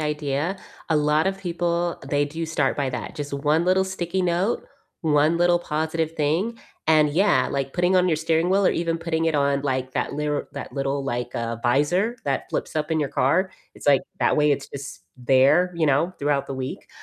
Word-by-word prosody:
idea, 150 +3 -1 0.3
a 160 - +2
lot 150 +2 +2
of 195 0 -1
people, 175 -2 -1
they 145 0 +2
do 160 +3 -5
start 145 -4 0
by 140 -2 0
that, 125 - -5
just 145 -1 -5
1 150 +4 +1
little 190 +1 +3
sticky 190 -1 -2
note, 180 +5 0 0.4
1 155 +1 +3
little 175 0 +3
positive 160 0 -2
thing, 165 +9 -1 0.3
and 155 -1 +4
yeah, 150 -6 +3
like, 135 -1 -3
putting 180 +1 +2
on 180 0 +3
your 160 - +2
steering 160 +2 +1
wheel 195 +1 +3
or - - +5
even 165 -1 -1
putting 165 -1 -1
it 160 - +1
on, 140 -1 +2
like, 130 -2 -2
that - - -2
lir 150 0 -2
that 140 - -7
little, 140 0 -2
like, 120 -2 -3
uh, 115 0 -2
visor 175 - +1
that 140 -1 -2
flips - - -3
up 155 0 -2
in 160 - +1
your 145 -3 -1
car, 185 +9 +2 0.2
it's - - -12
like, 140 -2 +5 0.2
that 120 - +2
way 150 0 +3
it's 140 -1 -1
just 140 0 -8 0.2
there, 135 +8 +4
you 165 - +1
know, 165 +6 +2
throughout 140 -1 0
the 135 - -5
week, 130 0 -6
155 Hz, 205 wpm, -24 LUFS, 140-175 Hz, 0.4 s, or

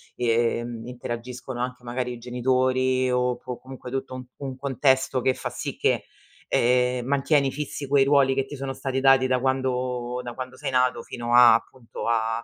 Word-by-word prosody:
ehm, 120 -1 0
interagiscono 125 +1 -6
anche 125 0 -4
magari 125 +1 -3
i 120 - -8
genitori 130 +1 +1
o 125 0 +1
po 125 -1 -7
comunque, 130 -1 -10
tutto 135 0 -4
un 130 - -7
un 135 -2 -6
contesto 130 -1 +1
che 130 - +2
fa - - -4
sì - - -5
che, - - +1 0.4
ehm, 125 0 +2
mantieni 140 0 +2
fissi 145 -1 -5
quei 140 0 +4
ruoli, 140 -1 +4
che 135 0 0
ti 145 - -8
sono 135 -1 -4
stati 135 0 -2
dati, 135 -1 +5
da 130 -1 +1
quando 125 -1 -1
da 120 - -6
quando 130 +1 -7
sei - - -4
nato, 125 -2 +2
fino 120 0 -4
a, 120 -2 +9
appunto, 115 0 -5
a 115 0 0
125 Hz, 180 wpm, -25 LUFS, 120-130 Hz, 0.4 s, a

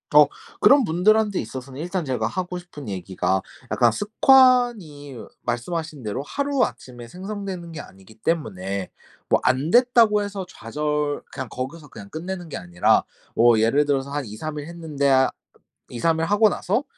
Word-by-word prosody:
어. 150 0 +9 0.3
그런 280 0 +6
분들한테 205 +3 +2
있어서는 130 +4 -7
일단 175 +2 -2
제가 125 -6 -2
하고 180 +7 -4
싶은 165 -8 -10
얘기가 95 0 -1 0.3
약간 - - +4
습관이 220 - +3 0.3
말씀하신 150 +5 -3
대로 110 +5 -3
하루아침에 250 - -2
생성되는 190 - -6
게 160 - -7
아니기 95 -2 -13
때문에 100 - -3 0.4
뭐 - - +4
안 130 +5 +1
됐다고 235 -3 +5
해서 200 -2 -5
좌절 150 +1 -2
그냥 135 -2 -5
거기서 145 +6 -6
그냥 100 - -11
끝내는 175 - -6
게 - - -5
아니라, 90 0 +2 0.3
뭐 115 -1 +5
예를 115 +7 +3
들어서 140 -1 0
한 145 -1 -3
2-3 120 +9 -6
일 145 - -5
했는데 160 -4 -2
아 130 -1 +4 0.6
2-3 160 +7 0
일 165 - +1
하고 205 +4 +4
나서 210 +6 -1
150 Hz, 315 characters per minute, -23 LUFS, 125-190 Hz, 0.6 s, 어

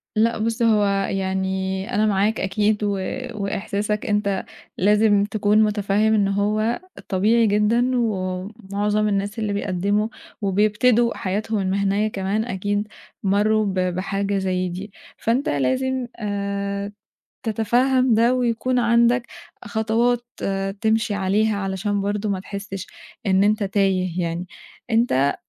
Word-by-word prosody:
لأ 225 +2 +2
بُصّ 225 +2 -2
هو 215 -3 +4 0.2
يعني 190 0 -2
أنا 215 +1 +3
معاك 210 +1 +1
أكيد 210 +2 0
و 205 - +1 0.4
وإحساسك 205 0 -2
أنت 205 -2 0 0.3
لازم 205 +1 +4
تكون 210 +1 +2
متفهّم 210 +1 +1
إن 205 -2 +3
هو 210 +3 0 0.3
طبيعي 220 +4 +3
جدًا 215 +5 +2
ومُعظم 205 0 -1
الناس 205 +2 -1
اللي 210 -2 -1
بيقدّموا 200 +2 0 0.3
وبيبتدوا 215 +4 +3
حياتهم 210 +3 -2
المهنية 200 +2 +1
كمان 205 +1 -1
أكيد 205 0 -2 0.4
مرّوا 210 +2 +2
ب 195 - -1
بحاجة 195 +2 -1
زي 185 -1 -1
دي، 190 +4 -7 0.3
فأنت 240 +5 0
لازم 260 - 0
آآ، 200 -1 -3 0.5
تتفهّم 245 +3 +2
ده 235 +3 +4
ويكون 250 0 0
عندك 235 +1 +3 0.4
خطوات 235 +1 +1 0.6
تمشي 220 -1 +1
عليها 205 +2 +1
علشان 200 +1 -2
برضه 205 +1 -1
ما 195 -2 -1
تحسّش 195 -1 -6 0.4
إن 190 0 +4
أنت 210 0 +2
تايه 190 -3 0
يعني، 170 +1 -3 0.4
أنت 225 - +2
205 Hz, 120 wpm, -22 LUFS, 195-220 Hz, 0.6 s, هو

